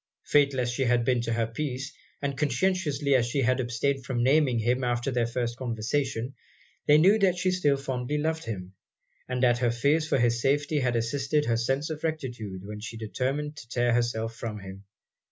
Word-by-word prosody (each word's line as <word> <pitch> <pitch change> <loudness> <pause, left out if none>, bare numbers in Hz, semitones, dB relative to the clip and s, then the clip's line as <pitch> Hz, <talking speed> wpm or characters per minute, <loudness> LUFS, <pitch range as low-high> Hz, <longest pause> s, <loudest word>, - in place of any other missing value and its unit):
Fatal 140 -2 +3
as 120 0 -1
he 135 - -2
had 120 -1 +2
been 125 -1 +2
to 115 0 -2
her 115 0 +1
peace, 130 +3 -4 0.3
and 140 -1 -1
conscientiously 150 0 +1
as 120 -3 +3
she 135 +3 0
had 130 +2 +2
abstained 130 +3 -1
from 120 -2 -1
naming 135 -2 +3
him 120 +3 +1
after 120 +2 0
their 120 -2 +1
first 120 0 -2
conversation, 125 +1 -2 0.5
they 150 - +7
knew 195 +7 +5
that 185 -3 +3
she 185 +1 +1
still 150 -7 +2
fondly 135 +1 -3
loved 160 +2 -1
him, 95 -5 -6 0.6
and 125 0 -1
that 120 -1 +4
her 120 -1 +2
fears 140 +7 +1
for - - +2
his 120 -1 +2
safety 145 +3 +1
had 125 -3 0
assisted 135 +6 0
her 115 - +1
sense 135 +7 -1
of 155 0 -6
rectitude 120 - -4
when 105 +1 -7
she 110 +2 -7
determined 135 +7 -2
to 135 -6 -11
tear 120 -1 +1
herself 115 -1 0
from 110 -2 -5
him. 95 +1 -10
125 Hz, 195 wpm, -27 LUFS, 115-145 Hz, 0.6 s, they